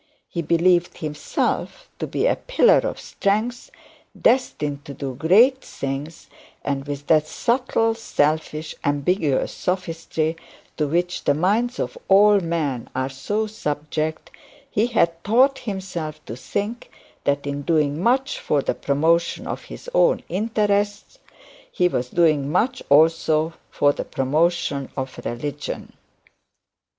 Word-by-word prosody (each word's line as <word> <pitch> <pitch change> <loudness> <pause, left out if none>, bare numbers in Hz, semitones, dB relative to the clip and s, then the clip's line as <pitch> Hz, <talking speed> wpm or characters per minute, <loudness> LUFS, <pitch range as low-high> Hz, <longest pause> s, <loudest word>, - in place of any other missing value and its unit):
He 170 - -3
believed 170 +2 +2
himself 150 -1 -2
to - - -2
be - - -2
the - - +3
pillar - - +4
of - - -3
strength, 225 - -1 0.5
destined 150 - +1
to 140 - -8
do 135 -2 -4
great 220 - +5
things; 140 +4 -6 0.4
and 140 0 -2
with 145 0 -5
that 155 -1 +3
subtle, 235 - +1
selfish, 155 -6 -1
ambiguous 145 0 +1
sophistry 165 -3 -2 0.4
to 150 - +1
which 175 +4 -1
the 145 - +3
minds 220 - +1
of - - -4
all 205 +1 +6
men 160 -8 -2
are 130 +1 -1
so 205 +12 -2
subject, 155 -5 -3 0.4
he 215 +3 +2
had 170 -8 +1
taught 260 +6 +4
himself 180 -7 -5
to 115 - -6
think 205 - -4 0.4
that 140 0 +1
in 140 0 -3
doing 150 0 +1
much 260 +6 +1
for 145 -2 0
the - - 0
promotion 165 +4 +1
of - - -5
his - - -10
own - - +3
interests 205 +1 0 0.5
he 180 - +2
was 125 -7 -2
doing 150 -4 +2
much 250 +9 +1
also 160 +1 +4 0.2
for 145 0 +2
the - - -4
promotion 145 0 0
of 130 -1 -4
religion. 145 +4 -5
165 Hz, 130 wpm, -22 LUFS, 145-205 Hz, 0.5 s, all